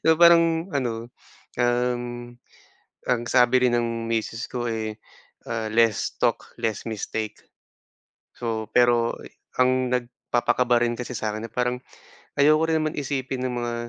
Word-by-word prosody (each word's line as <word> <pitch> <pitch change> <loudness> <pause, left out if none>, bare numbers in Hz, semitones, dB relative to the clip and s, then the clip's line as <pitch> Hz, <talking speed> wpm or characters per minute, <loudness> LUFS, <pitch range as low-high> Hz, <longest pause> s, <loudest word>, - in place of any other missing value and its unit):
So, 160 0 +6
parang 170 +1 +5
ano, 120 -4 -2 0.5
um, 120 0 -1 0.7
ang 125 -2 +1
sabi 125 +1 +4
rin 120 - +2
ng 115 -1 -1
misis 115 +1 -2
ko, 120 -1 -3
eh, 110 -1 -3 0.5
ah, 115 -1 -2
"Less 115 -1 +2
talk, - - 0
less 115 -1 -3
mistake." 110 0 -4 0.9
So, 110 -2 -3
pero 120 -1 +4
e - - -12 0.3
ang 130 0 +3
nagpapakaba 120 -1 +1
rin 120 0 0
kasi 125 0 -5
sakin, 110 +1 -3
na - - -30
parang, 125 +1 -1 0.6
ayoko 155 +2 +5
rin 160 - +2
naman 155 -1 -2
isipin 135 -2 -3
ng 125 - -4
mga 120 0 -2
120 Hz, 140 wpm, -24 LUFS, 115-130 Hz, 0.9 s, So